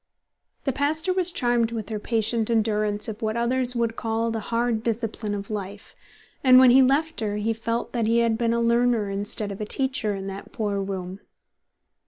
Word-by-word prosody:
The 270 - 0
pastor 310 +6 0
was 365 -1 +1
charmed 240 -6 +1
with 225 -2 -5
her 215 -1 -3
patient 225 0 0
endurance 215 -2 +1
of 215 -2 -6
what 220 0 -1
others 250 +1 0
would 230 -1 0
call 225 0 -1
the 225 - -2
hard 230 +1 -1
discipline 220 -2 -2
of 200 +1 -6
life, 200 -1 -6 0.5
and 255 -1 +7
when 255 -1 +8
he 265 +2 +7
left 290 +5 +2
her 210 -2 -2
he 215 +2 0
felt 230 +1 -3
that 230 -3 0
he 230 +1 +3
had 230 -1 +2
been 230 0 0
a 235 - +1
learner 235 -3 +2
instead 205 +1 -3
of 200 - -7
a - - -2
teacher 260 -4 0
in 195 0 -6
that 195 0 -7
poor 205 -4 -2
room. 190 -1 -5
225 Hz, 195 wpm, -24 LUFS, 210-240 Hz, 0.5 s, when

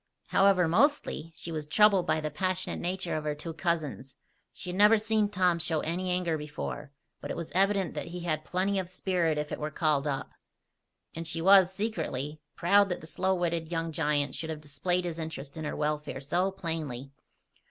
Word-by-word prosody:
However, 190 -3 +4
mostly, 190 - +2
she 170 - -7
was 155 -2 -4
troubled 200 +2 +4
by 155 - +2
the 155 0 -3
passionate 185 +4 -1
nature 180 -1 -2
of 155 - -2
her 150 -1 -1
two 165 +2 -6
cousins. 155 -6 -2 0.4
She 180 - -6
had - - -5
never 210 +2 +7
seen 215 -1 +1
Tom 180 -4 +2
show 160 -2 +3
any 180 +3 -2
anger 180 -3 0
before; 150 -1 -6 0.3
but - - -6
it - - -3
was 170 -2 -5
evident 195 0 +2
that - - -5
he 175 +1 -6
had 155 -3 -1
plenty 190 +4 0
of 180 -2 -4
spirit 180 -4 0
if 150 0 -3
it - - -3
were 150 - -2
called 150 -2 +1
up. 135 -2 -3 0.8
And 165 0 -5
she 165 +1 -2
was, 190 +1 +6
secretly, 160 - -3 0.2
proud 200 +3 +4
that 180 - -3
the - - -10
slow 190 +3 0
witted 170 -2 -1
young 165 -1 -1
giant 145 -3 0
should 160 - -5
have 155 -1 -5
displayed 175 +5 -1
his 170 -1 -4
interest 150 -3 -6
in 160 -1 -5
her - - -3
welfare 150 0 -2
so 175 +7 0
plainly. 155 -8 -4
165 Hz, 195 wpm, -29 LUFS, 150-185 Hz, 0.8 s, never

